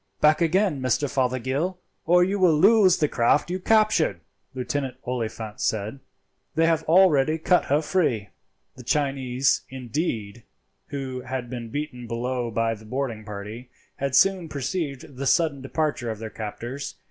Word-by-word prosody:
"Back 155 +2 +4
again, 170 -3 +2
Mr. 130 +3 +1
Fothergill, 130 +7 -1 0.3
or 180 +1 +6
you 195 +2 0
will 175 -5 +5
lose 200 -1 +6
the 150 - +2
craft 145 +6 +2
you 185 - -2
captured," 215 - +3 0.4
Lieutenant 130 0 -3
Oliphant 115 -3 -4
said; 110 +5 -1 0.6
"they 165 - +4
have 165 -1 +2
already 160 -4 +4
cut 180 +3 +2
her 145 +3 +1
free." 130 - 0 0.5
The 130 - -11
Chinese, 135 -1 +1
indeed, 120 - -3 0.5
who 135 -3 -5
had 130 -2 -4
been 120 -2 -5
beaten 125 -3 -5
below 120 +1 -2
by 115 0 0
the 110 0 -11
boarding 120 -2 -3
party, 105 +4 -8 0.3
had 140 -1 -1
soon 185 +1 +3
perceived 140 -1 -4
the 135 +1 -2
sudden 155 -3 +2
departure 135 -3 -2
of 110 - -3
their 110 0 -7
captors. 120 +6 -6
135 Hz, 145 wpm, -25 LUFS, 120-160 Hz, 0.6 s, or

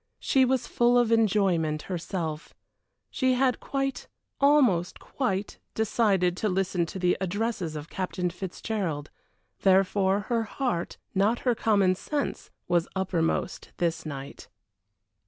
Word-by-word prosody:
She 265 -2 +3
was 255 -1 +1
full 240 +1 +3
of 240 -2 +3
enjoyment 190 -9 +2
herself; 170 -3 -4 0.6
she 260 -1 +2
had 255 -1 +2
quite 270 -2 -3 0.3
almost 260 - +3
quite 205 -7 -3 0.2
decided 200 -5 +2
to 215 - 0
listen 180 -2 0
to 190 - -7
the 180 -1 +2
addresses 190 -3 -2
of 150 0 -6
Captain 180 0 -3
Fitzgerald, 180 -4 -4 0.5
therefore 195 +1 +3
her 230 +3 0
heart, 225 -5 -3 0.2
not 205 +5 +2
her 245 - +4
common 205 -5 +3
sense, 285 +9 -3 0.2
was 175 -1 +2
uppermost 180 -4 -1
this 170 -1 -1
night. 140 -2 -8
195 Hz, 120 wpm, -27 LUFS, 175-235 Hz, 0.6 s, her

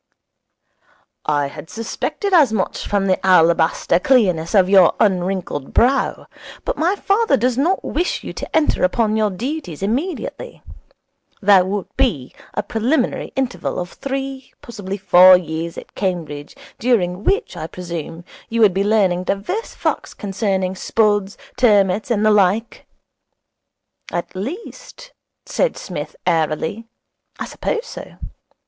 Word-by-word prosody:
'I 145 -1 +2
had 150 +2 -11
suspected 300 - -3
as 300 -10 +6
much 205 -4 -2
from 200 -1 0
the 185 -1 0
alabaster 170 -2 +3
clearness 185 -8 +2
of 190 -2 +5
your 190 -3 +5
unwrinkled 185 -7 -1
brow. 260 +4 +2 0.4
But - - -1
my 345 +5 +1
father 415 +3 +2
does 245 +2 +1
not 330 +9 +1
wish 350 +4 -1
you - - -6
to - - -6
enter 315 -1 +2
upon 215 +3 +2
your 215 -1 +2
duties 220 - -5
immediately. 320 - -3 0.8
There 195 -3 +5
would 195 0 -2
be 190 - 0 0.2
a - - -1
preliminary 235 +8 -1
interval 265 -2 -2
of 180 0 -4
three, 270 -1 -5
possibly 200 -4 -6
four, 185 -1 +7
years 165 -1 -5
at - - -10
Cambridge, 160 -7 -4 0.2
during 200 -6 +1
which 410 - 0
I 160 - -5
presume, 170 -1 -7 0.2
you 230 - -1
would 205 -4 +6
be 195 +2 +1
learning 195 -4 +2
divers 235 - -3
facts - - -2
concerning 190 -2 -2
spuds, 205 -1 0 0.2
turmuts, 205 -4 +3
and 215 -3 +1
the 215 - +5
like. 210 +3 +1 1.2
At 175 +2 -4
least,' 435 - -8 0.3
said - - 0
Psmith - - -6
airily, 160 +7 -1 0.5
'I - - -3
suppose 465 0 -3
so. - - -10
205 Hz, 130 wpm, -19 LUFS, 180-255 Hz, 1.2 s, four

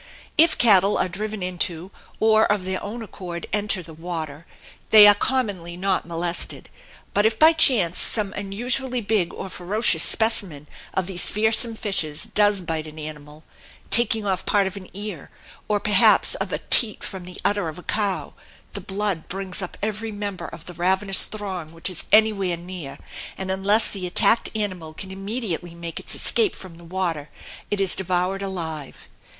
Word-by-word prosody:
If 325 +1 +5
cattle 200 -3 +4
are - - +1
driven 210 +2 -5
into, 180 0 -2 0.3
or 220 -1 +4
of 205 -3 -1
their 185 0 -3
own 225 +3 -6
accord 175 -4 -7
enter, 205 -3 0
the 165 0 -12
water, 160 -2 -6 0.4
they 215 -1 +9
are 205 - +8
commonly 200 -7 -2
not 190 -2 -1
molested; 170 +1 -3 0.4
but 205 - +2
if 220 0 +2
by 315 +1 +7
chance 235 - +4
some 210 -3 0
unusually 245 +6 -1
big 200 -5 0
or - - -7
ferocious 185 -1 +1
specimen 195 -11 +3 0.3
of 190 - 0
these 180 -1 +1
fearsome 220 +2 +2
fishes 165 -9 -2
does 205 -2 +2
bite 160 -2 -3
an 155 0 -12
animal 150 0 -9 0.5
taking 225 -2 +3
off 190 -2 -1
part 200 -1 +2
of 190 0 -4
an 190 -2 -10
ear, 200 -5 -7 0.4
or 210 -1 +1
perhaps 205 -1 +4
of - - -3
a - - -1
teat 220 -4 +5
from 190 -2 -7
the 180 0 -7
udder 205 -5 +1
of 155 - -9
a 180 - -11
cow 195 -8 -2 0.4
the 200 - -5
blood 195 -3 -3
brings 190 0 -3
up 180 - -7
every 215 +1 -3
member 205 -2 -5
of 165 - -11
the 180 - -9
ravenous 190 +3 +4
throng 190 -7 -6
which 165 +3 -5
is 180 - -3
anywhere 205 -5 +3
near, 175 -5 -8 0.4
and 190 0 -4
unless 200 +4 +2
the 185 -3 -4
attacked 225 +5 +3
animal 180 -7 -4
can 190 +2 -8
immediately 195 -4 -4
make 170 -1 -6
its - - -5
escape 435 -5 +1
from 180 -3 -11
the - - -14
water 170 -4 -3 0.4
it 205 - -1
is 195 -2 +1
devoured 185 +1 -1
alive. 165 -7 -6
190 Hz, 170 wpm, -23 LUFS, 175-210 Hz, 0.5 s, they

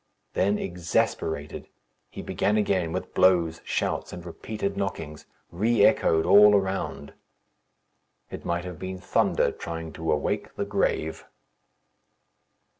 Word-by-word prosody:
Then, 100 +2 +2
exasperated, 80 -4 -2 0.4
he - - -8
began 105 +1 0
again 95 -5 +1
with - - -5
blows, 85 -3 +3
shouts, - - -2
and 90 -1 -9
repeated 100 +3 -4
knockings, 80 -6 -5 0.2
re 110 +6 +3
echoed 80 -1 +3
all 105 0 +7
around. 95 -7 -2 1.2
It - - -7
might 85 +1 -2
have 90 -3 -7
been 95 0 -5
thunder 90 - +1
trying 80 -1 -6
to 80 0 -2
awake 75 - -2
the - - -2
grave. 80 +1 -1
90 Hz, 115 wpm, -26 LUFS, 80-100 Hz, 1.2 s, all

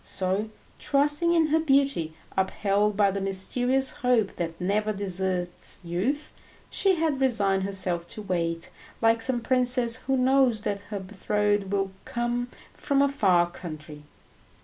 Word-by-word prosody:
So, 190 +3 -2 0.3
trusting 295 +4 +1
in 325 -1 +4
her 320 +2 +3
beauty, 275 - +1 0.2
upheld 200 +2 0
by 200 -2 +4
the 195 +1 -3
mysterious 245 +8 +3
hope 250 -7 0
that 165 -1 -4
never 210 +4 0
deserts 185 -3 -2
youth, 220 - -2 0.4
she 390 -2 +2
had 315 -5 -1
resigned 205 -7 +2
herself 185 -3 -2
to 215 +2 -7
wait, 165 -3 -2 0.3
like 225 0 +3
some 245 0 +1
princess 250 -1 +2
who 265 +1 -1
knows 255 -3 +3
that 200 -1 -3
her 205 -2 -4
betrothed 205 +1 -1
will 195 -1 -1
come 240 0 -2 0.3
from 280 -2 +1
a 280 - +2
far 185 -10 +3
country. 155 -3 -9
210 Hz, 140 wpm, -26 LUFS, 190-260 Hz, 0.4 s, in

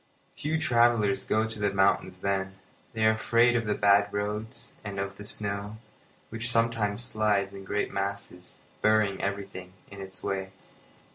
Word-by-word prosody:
Few 155 +2 -1
travellers 115 -7 +3
go 110 +1 +2
to 110 -1 -5
the 105 -1 +1
mountains 95 -1 +2
then. 95 -1 -1 0.4
They 110 -1 +1
are 110 - +6
afraid 115 +2 +3
of 115 -2 0
the 105 - +1
bad 100 0 +4
roads, 105 +3 -4
and 100 -2 -5
of 100 0 -4
the 105 - -9
snow, 105 0 -2 0.5
which 115 +2 -3
sometimes 115 -2 +1
slides 105 -4 +1
in 95 -1 -9
great 105 +1 -2
masses, 100 -2 -5 0.2
burying 110 -2 +3
everything 100 -2 -4 0.2
in 100 -1 -9
its 95 -1 -3
way. 95 -1 -3
100 Hz, 155 wpm, -28 LUFS, 100-110 Hz, 0.5 s, are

